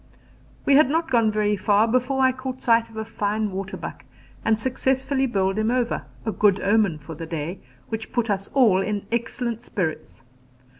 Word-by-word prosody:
We 280 - +4
had 300 -3 +5
not 325 +2 0
gone 230 -3 +3
very 210 -1 +1
far 205 +2 +3
before 255 +3 +1
I 260 - +5
caught 260 0 -6
sight 230 -1 +3
of 225 - -13
a 220 - -3
fine 215 -1 -1
waterbuck 190 0 -6 0.4
and 220 -1 +2
successfully 265 +2 0
bowled 195 -3 0
him 215 +1 +1
over 245 -1 0 0.2
a 220 - 0
good 205 -2 +3
omen 200 -5 +2
for 155 +2 -9
the 165 +1 -7
day, 165 +3 -4 0.3
which 220 0 -5
put 240 -2 0
us 200 -2 -1
all 220 -8 +5
in 205 0 -2
excellent 235 0 -2
spirits. 165 - -4
220 Hz, 180 wpm, -24 LUFS, 200-250 Hz, 0.4 s, had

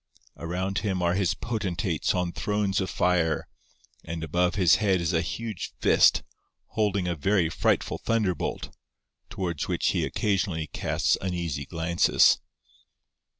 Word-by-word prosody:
Around 95 +4 -2
him 95 -4 -2
are 85 0 +2
his 95 -1 +1
potentates 95 -9 -2
on 90 -1 -1
thrones 105 0 -1
of 95 - -2
fire, 85 -3 +1 0.6
and 85 0 -5
above 90 +3 +1
his 90 -6 +5
head 95 -4 +2
is 85 +1 -1
a 80 - +2
huge 110 +3 -5
fist, - - +4 0.5
holding 100 -4 0
a 90 - 0
very 90 +2 +1
frightful - - 0
thunderbolt, 105 -8 -1 0.5
towards 85 -5 -3
which - - 0
he - - 0
occasionally 95 -6 -1
casts - - 0
uneasy 85 -7 -3
glances. 85 0 +3
90 Hz, 130 wpm, -26 LUFS, 85-100 Hz, 0.6 s, his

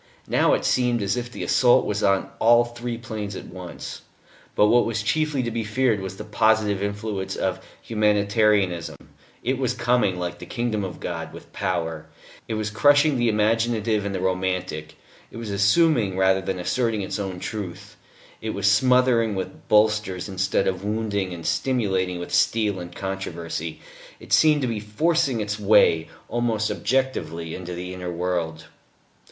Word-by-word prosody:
Now - - +3
it - - -3
seemed 120 -3 +2
as 100 0 0
if 120 -1 -4
the - - -6
assault 120 -1 +4
was 105 0 -2
on 95 -1 +1
all 120 +1 +5
three 120 0 -5
planes 110 -5 -6
at - - -7
once. 90 -1 -8 0.5
But - - +5
what 120 +3 +5
was 115 -2 -2
chiefly 150 +2 0
to 120 - -2
be 115 0 -2
feared 110 0 +1
was 95 0 -6
the 105 - -6
positive 105 -1 +2
influence 100 -1 -3
of - - -2 0.2
Humanitarianism: 105 -4 +1 0.5
it 130 +2 0
was 125 -1 0
coming, 120 -6 +1
like 90 -1 -4
the - - -9
kingdom 115 -4 -2
of 95 -2 -6
God, - - -5
with - - -13
power; 80 -5 -2 0.4
it 110 - -2
was 110 0 -2
crushing 145 +5 +4
the 120 -1 +2
imaginative 110 0 +1
and 100 -1 -3
the - - -2
romantic, 90 -4 -2 0.3
it - - -11
was 115 -3 -5
assuming 100 - +3
rather 95 0 +3
than 95 0 -3
asserting 110 +3 0
its 95 - -4
own 95 -3 -4
truth; 100 -4 -6 0.5
it 110 0 -3
was 100 -1 -2
smothering 115 +1 +4
with 95 - -6
bolsters 105 -3 +2
instead 95 0 0
of 95 0 -2
wounding 105 -3 -1
and 85 -2 -7
stimulating 95 -8 0
with 85 - -7
steel 105 -4 +2
or 90 - -6
controversy. 85 -3 -5 0.4
It - - -6
seemed 150 -2 +5
to - - +1
be 115 -3 -2
forcing 125 +3 +1
its 105 0 -3
way, 95 -5 +4 0.2
almost 115 -3 0
objectively, 90 -9 -1
into 90 -1 -6
the 90 +1 -6
inner 90 -1 -5
world. 85 -2 -2
105 Hz, 165 wpm, -24 LUFS, 95-115 Hz, 0.5 s, all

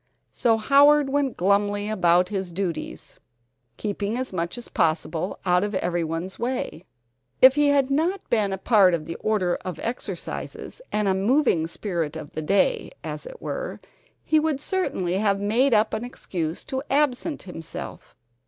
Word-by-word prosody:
So 230 -2 +2
Howard 280 +5 +5
went 280 -2 0
glumly 205 +2 +1
about 180 -3 +3
his 190 -3 -3
duties, 170 -3 -5 0.6
keeping 205 +2 -2
as 255 -5 -4
much 170 +4 -2
as 240 - -8
possible 165 +2 -1
out 180 +1 +3
of 205 -1 -2
everyone's 175 0 -2
way. 240 -8 -3 0.5
If 260 0 +9
he 295 +1 +3
had 280 -1 +3
not 335 +7 0
been 215 -4 +1
a 190 - -2
part 190 -4 +4
of 155 -2 -6
the 165 - -5
order 190 -5 0
of 180 -4 -5
exercises, 240 - -5
and 210 -1 0
a 190 - +3
moving 195 - +2
spirit 165 -4 -3
of 155 -2 -7
the 155 - -4
day, 200 - +1
as - - -6
it - - -11
were, - - -4 0.4
he 310 0 +3
would 305 -3 0
certainly 195 - -1
have 200 -2 +2
made 230 +7 +2
up 215 -1 +3
an 220 +1 -2
excuse 175 -9 -4
to 265 0 -3
absent 290 +2 0
himself. 165 -4 -8
205 Hz, 160 wpm, -24 LUFS, 180-265 Hz, 0.6 s, If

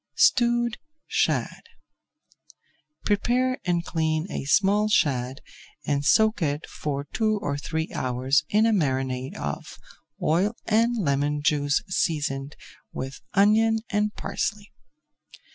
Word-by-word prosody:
STEWED 240 -1 +3 0.3
SHAD - - 0 1.4
Prepare 250 +5 +1
and 175 -1 0
clean 160 -1 -1
a - - -4
small 205 +7 +3
shad 135 -8 +1 0.4
and 145 -1 0
soak 220 +6 +3
it 145 -1 -1
for 140 -2 -4
two 215 -1 +1
or 145 -7 -2
three 160 +3 -3
hours 130 +2 +1
in 215 +2 +3
a 225 - +3
marinade 130 -6 -1
of - - -5 0.4
oil 185 +8 +1
and 230 +2 +2
lemon 145 -4 0
juice 145 -1 +1
seasoned 145 -6 -1 0.4
with 135 +1 -6
onion 220 +2 +4
and 210 0 +1
parsley. 210 0 -3
165 Hz, 110 wpm, -25 LUFS, 140-215 Hz, 1.4 s, onion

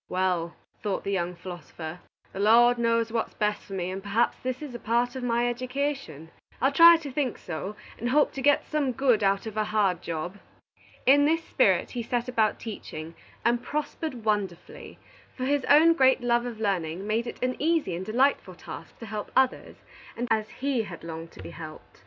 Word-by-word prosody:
"Well," 180 -2 0 0.3
thought 205 -3 -2
the 200 - -2
young 180 -2 -1
philosopher, 175 -2 -8 0.3
"the - - -6
Lord 235 +4 +5
knows 230 -1 +1
what 230 -1 0
is - - -23
best 210 -1 -1
for 195 - -10
me, 185 -1 -2
and 190 +1 -5
perhaps 205 +4 +1
this 255 +3 -3
is 285 -4 -7
a 240 - -6
part 240 +3 0
of 260 - -4
my 240 0 +1
education. 250 - -3 0.3
I'll 270 - +3
try 335 +3 +9
to 300 -4 -7
think 260 -2 -1
so, 185 +5 -6 0.2
and 240 - -1
hope 295 +3 +3
to 270 - -5
get 290 +2 +3
some 290 -4 -1
good 245 -3 +2
out 195 +1 +2
of 220 -1 -6
a 215 - +1
hard 200 -5 +1
job." 170 +4 -5 0.7
In 285 +2 +6
this 325 +2 +2
spirit - - +2
he 245 - -3
set 240 +1 -2
about 225 -4 +1
teaching, 165 -7 -7 0.3
and 235 0 +2
prospered 295 -3 -4
wonderfully, 200 -5 -3 0.4
for 255 - -2
his 280 0 +1
own 315 +3 +6
great 265 -4 +4
love 240 0 +1
of 230 -3 -7
learning 185 -3 -1
made 225 +3 0
it - - -6
an 255 0 0
easy 315 - +1
and 180 - -4
delightful 255 +8 +1
task - - -10
to - - -6
help 210 -1 -5
others 265 -1 +1 0.5
as 215 -1 +1
he 270 -2 -1
had 185 -7 -8
longed 165 0 -7
to 95 - -11
be 85 - -8
helped. - - -11
230 Hz, 195 wpm, -27 LUFS, 195-260 Hz, 0.7 s, try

